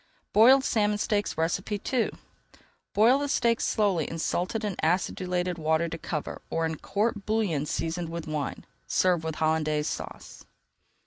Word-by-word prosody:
BOILED 255 +5 +7
SALMON 210 -5 +1
STEAKS 205 0 0
II 205 +8 0 0.9
Boil 235 +6 +5
the 285 - -1
steaks 235 -4 +1
slowly 195 -8 +1
in 165 - -5
salted 185 +6 -1
and 200 -3 -2
acidulated 180 +1 0
water 160 +1 +1
to 165 - -5
cover 150 -2 -4
or 165 0 0
in 160 -1 -2
court 210 0 -1
bouillon 200 -10 0
seasoned 165 +2 -2
with 170 -1 -5
wine. 150 -3 -4 0.2
Serve 180 -3 +2
with 160 -1 -3
Hollandaise 155 -1 +1
Sauce. - - -7
180 Hz, 140 wpm, -27 LUFS, 160-215 Hz, 0.9 s, BOILED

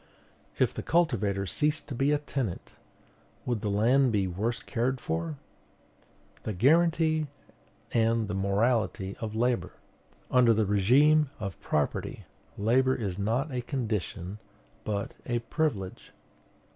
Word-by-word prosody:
If - - +2
the - - -4
cultivator 105 - +1
ceased 150 +9 +1
to - - -4
be 135 +4 +1
a 150 - +3
tenant, 135 -9 -4 0.7
would 120 -4 -1
the 105 - -1
land 120 +6 +3
be 100 -3 +1
worse 105 +6 -2
cared 125 +2 -1
for? 80 - -3 1.0
"The 110 - -4
guarantee 155 - +3 0.6
and 115 -1 +2
the 105 - -3
morality 100 0 0
of 110 -1 -5
labor." 120 -6 0 0.6
Under 120 -3 +5
the 110 0 +2
regime 135 +10 +4
of 100 -3 -5
property, 75 -1 -2 0.3
labor 130 +5 +3
is 100 -5 -3
not 115 +9 0
a 125 -1 -2
condition, 105 - -3 0.5
but 100 -2 -2
a 120 - 0
privilege. 115 - -2
115 Hz, 125 wpm, -28 LUFS, 100-130 Hz, 1.0 s, Under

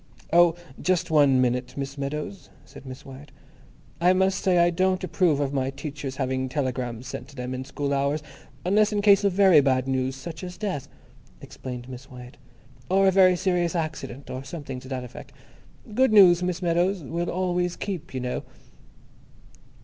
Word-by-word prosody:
"Oh, 170 -1 +6 0.3
just 180 -3 0
one 140 -4 +5
minute, 125 +1 -1
Miss 135 0 -4
Meadows," 150 +7 -5 0.2
said 135 - -13
Miss 130 0 -9
Wyatt. 135 +2 -12 0.7
"I 180 +2 +4
must 190 +1 +2
say 185 -2 +2
I 175 0 +4
don't 185 +2 +1
approve 175 -4 +1
of 140 -1 -1
my 135 -1 0
teachers 140 -1 -6
having 130 -1 -2
telegrams 125 -4 -3
sent 125 -1 -7
to 140 - -16
them 125 -1 -5
in 130 0 -4
school 140 +1 -3
hours, 140 +2 0 0.4
unless 210 +3 +3
in 205 -1 -1
case 200 -1 +6
of 200 - +3
very 185 -5 +6
bad 130 -1 +1
news, 130 0 -1
such 155 +7 -8
as 180 -1 -7
death," 185 -9 -3 0.5
explained 125 -2 -8
Miss 130 +1 -10
Wyatt, 125 -1 -12 0.5
"or 195 +1 +4
a - - +5
very 185 -1 +5
serious 180 -2 0
accident, 150 -5 -4
or 130 +1 -5
something 135 -3 -7
to 130 - -13
that 130 -1 -4
effect. 125 - -11 0.6
Good 260 +2 +3
news, 180 -5 +7
Miss 180 0 -2
Meadows, 175 +1 +1
will 170 +5 -3
always 180 -1 -1
keep, 180 -5 -5
you 130 -2 -4
know." 125 0 -3
150 Hz, 175 wpm, -25 LUFS, 130-180 Hz, 0.7 s, news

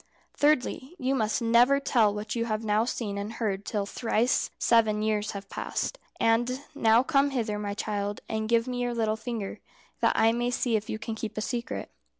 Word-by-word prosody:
"Thirdly, 290 +1 +1
you 265 -3 0
must 220 -3 0
never 240 +4 +5
tell 230 -6 +3
what 210 +3 -4
you 230 -1 0
have 215 -1 -2
now 215 +1 +2
seen 210 -5 -3
and 205 +2 -5
heard 200 -4 -2
till 205 -2 -1
thrice 230 +3 +1
seven 220 -2 +3
years 215 -1 0
have 200 -1 -7
passed. - - -3 0.2
And 240 +4 +2
now 225 -3 +4
come 275 0 +3
hither, 225 -6 -2
my 205 -1 -3
child, 205 -1 -2
and 220 0 -2
give 230 +1 +3
me 250 -1 -2
your 245 -1 -1
little 220 -2 +1
finger, 220 -3 -5 0.4
that - - +3
I 225 - +5
may 240 +1 0
see 245 -2 0
if 215 0 -2
you - - -2
can 220 +1 -5
keep 220 0 -6
a - - 0
secret." 235 - -4
225 Hz, 195 wpm, -28 LUFS, 215-245 Hz, 0.4 s, never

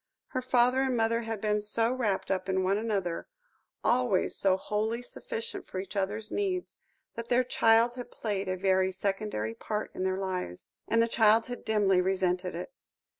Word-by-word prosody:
Her 255 - -2
father 250 +1 +3
and 260 -2 +1
mother 230 +1 +2
had 225 -2 -4
been 210 0 +1
so 225 +3 +1
wrapped 215 -8 -1
up 185 0 -1
in 190 0 +1
one 195 +2 +2
another, 195 -6 -2 0.6
always 245 -6 +2
so 190 -1 +3
wholly 220 +4 -2
sufficient 455 - -5
for - - -7
each 190 +2 -7
other's 205 +2 -2
needs, 375 -3 -2 0.3
that 230 0 -7
their 250 +1 +4
child 230 -1 +4
had 245 -1 -7
played 200 -5 -3
a 185 - -1
very 190 0 +2
secondary 195 - -2
part 210 - -4
in - - -3
their 190 0 0
lives. 185 - -4 0.2
And 230 0 +3
the - - +1
child 225 0 +4
had 245 0 -7
dimly 200 -4 +3
resented 185 -1 0
it. - - -6
210 Hz, 175 wpm, -29 LUFS, 190-235 Hz, 0.6 s, their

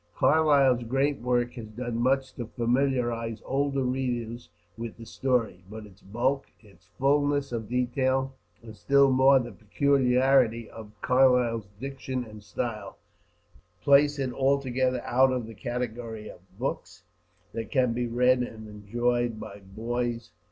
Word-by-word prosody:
Carlyle's 140 -5 +4
great 135 +4 0
work 120 0 0
has 115 -3 -8
done 120 +2 -5
much 130 +2 +1
to 120 - -6
familiarize 120 -2 0
older 140 0 0
readers 120 -2 -3 0.3
with 115 0 -7
the 115 - -10
story; 115 -9 -1
but 110 0 -8
its 100 -1 -18
bulk, 125 +7 -1
its 105 -3 -21
fullness 145 0 +1
of 115 -3 -4
detail, 130 +2 0 0.3
and 110 -2 -11
still 140 +3 +4
more 135 +1 +6
the 120 -2 -2
peculiarity 125 -1 +2
of 110 -2 -11
Carlyle's 125 -4 +3
diction 130 -1 -4
and 105 -2 -12
style, 105 0 -5 0.9
place 145 +1 +5
it 130 -3 -2
altogether 130 -2 +1
out 130 +2 +3
of 125 -3 -2
the 115 - -10
category 120 -3 -5
of - - -12 0.2
books - - -5 0.5
that 115 - -5
can 130 -4 +2
be 120 +1 -1
read 125 +2 +3
and 110 -3 -5
enjoyed 120 +3 -1
by 100 -1 -9
boys. 115 +4 -4
125 Hz, 135 wpm, -27 LUFS, 115-135 Hz, 0.9 s, more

